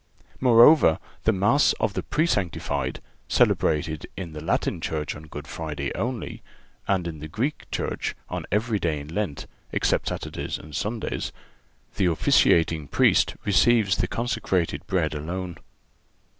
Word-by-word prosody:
Moreover, 120 - +7 0.3
the 110 - +5
Mass 105 +8 +3
of 100 - -1
the - - -2
Presanctified, 100 - -1 0.3
celebrated 75 0 +1
in 85 -4 -6
the 75 0 -7
Latin 80 - 0
church 75 -2 -3
on 80 +1 -11
Good 75 -1 -8
Friday 75 -4 -4
only, 120 0 -4 0.5
and 95 -3 +1
in 80 -2 -6
the 80 - -6
Greek 120 - -3
church - - -3
on - - -5
every 105 +1 +1
day 80 -4 -1
in 70 +1 -9
Lent, 85 -8 -2 0.3
except - - +1
Saturdays - - -4
and 75 -1 -11
Sundays, 110 +1 -3 0.7
the 95 - +3
officiating 80 -2 +3
Priest - - +3
receives 105 0 +4
the - - 0
consecrated 95 -7 -1
Bread 85 -5 0
alone. 85 +4 -4
90 Hz, 135 wpm, -25 LUFS, 80-110 Hz, 0.7 s, Moreover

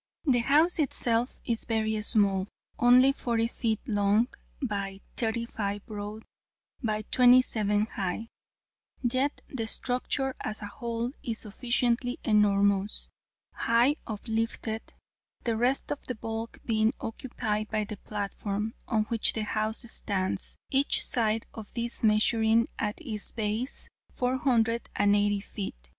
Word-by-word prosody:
The 255 -5 +4
house 305 +8 +4
itself 240 -4 +2
is 230 -2 0
very 220 -1 0
small 200 -3 +2 0.3
only 250 +2 +7
40 230 -3 0
ft. 225 -2 -1
long, 210 0 +2 0.3
by 200 -6 -3 0.2
35 220 -3 -2
broad, 210 0 -6 0.6
by 215 -3 -1
27 230 -5 +5
high: 210 +1 -4 0.7
yet 255 +4 0
the 230 -5 -4
structure 260 +3 -1
as 215 -1 -3
a - - -3
whole 235 +3 -3
is 230 -2 -3
sufficiently 245 +2 0
enormous, 200 -2 +2 0.4
high 240 +6 +3
uplifted: 225 0 -2 0.6
the 230 -2 0
rest 245 +4 +1
of 290 - -3
the 250 - -3
bulk 225 +1 -5
being 220 0 +2
occupied 220 -2 -3
by 215 -1 0
the 210 0 -6
platform, 205 +1 -3
on 220 -3 +2
which 225 +1 +1
the 220 - -2
house 215 +2 -1
stands, 190 -2 -1 0.2
each 275 +1 +3
side 225 -2 +1
of 220 -2 -9
this 235 0 -1
measuring 220 +1 +3
at 210 -1 -2
its 225 -10 +1
base 220 +4 -2 0.3
480 230 -5 +1
ft. 200 0 -5
225 Hz, 120 wpm, -28 LUFS, 210-245 Hz, 0.7 s, only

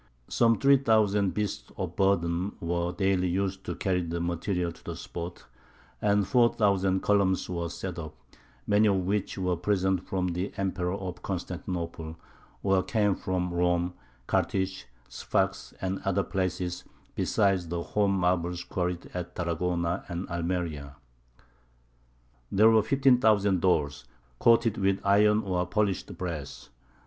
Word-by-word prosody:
Some 115 -2 +3
three 140 0 +6
thousand 105 -6 +2
beasts 105 -2 -3
of - - -4
burden 95 -1 +1
were 85 +1 -1
daily 95 -1 +1
used 95 +1 -1
to - - -3
carry 95 -2 0
the 85 0 -3
materials 85 +1 -1
to - - -24
the - - -5
spot, 85 +1 -7 0.6
and 100 -1 +2
four 120 -2 +4
thousand 95 -4 +2
columns 100 -2 +2
were 85 -2 -3
set 85 +1 -5
up, 80 -2 -7 0.5
many 105 +1 +4
of 95 -3 +1
which 100 +1 -1
were 90 -1 0
presents 95 0 +1
from 90 -1 0
the 90 +3 -3
Emperor 95 -1 -1
of 95 -3 -6
Constantinople, 85 -3 -4 0.5
or 95 -1 +3
came 105 -1 +1
from 90 -1 -2
Rome, 90 0 +1 0.3
Carthage, 95 -3 -1 0.2
Sfax, - - -1
and 95 0 -2
other 100 0 0
places, 90 -1 -2 0.3
besides 95 -4 +1
the 85 +1 -3
home 100 0 +1
marbles 90 -1 0
quarried 90 -1 -3
at 90 -1 -5
Tarragona 85 +1 -1
and 85 +1 -4
Almeria. 85 -5 -3 1.6
There 110 +3 +6
were 110 -1 +5
fifteen 130 +3 +3
thousand 100 -5 +3
doors, 75 -7 +1 0.3
coated 115 -1 +4
with 95 0 +2
iron 105 +2 +4
or 90 -2 0
polished 100 -1 -1
brass. 80 -6 -6
95 Hz, 135 wpm, -28 LUFS, 85-100 Hz, 1.6 s, three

